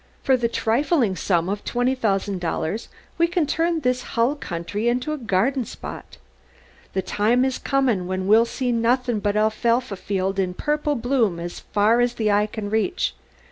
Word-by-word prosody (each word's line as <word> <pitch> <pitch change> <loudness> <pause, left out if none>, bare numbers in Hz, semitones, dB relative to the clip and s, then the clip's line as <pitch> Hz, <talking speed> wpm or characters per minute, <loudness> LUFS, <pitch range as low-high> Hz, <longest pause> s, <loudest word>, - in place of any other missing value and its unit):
For 265 - +4
the 240 -2 +1
trifling 235 - +1
sum 170 0 0
of 200 +1 -3
twenty 245 +2 0
thousand 200 -6 -1
dollars 170 +5 -2 0.3
we 335 - +5
can 345 -2 +1
turn 330 +2 0
this 250 -1 +1 0.2
hull 235 +4 +3
country 200 - -4
into 250 +5 0
a - - -3
garden 240 +4 +1
spot! - - -9 0.8
The 190 - -1
time 225 +7 +2
is 265 -1 -1
comin' 250 -10 +1
when 185 0 -2
we'll 220 +4 +5
see 250 +1 -2
nothin' 240 0 +1
but 205 0 -1
alfalfa 220 +2 +1
field 195 0 -2
in 180 -1 -1
purple 295 +3 0
bloom 235 -7 +1
as 175 +1 -6
fur 215 +4 +2
as 245 0 +1
the 215 -3 +1
eye 205 +1 +3
can 210 -1 -6
reach! 220 - 0
230 Hz, 175 wpm, -23 LUFS, 200-255 Hz, 0.8 s, we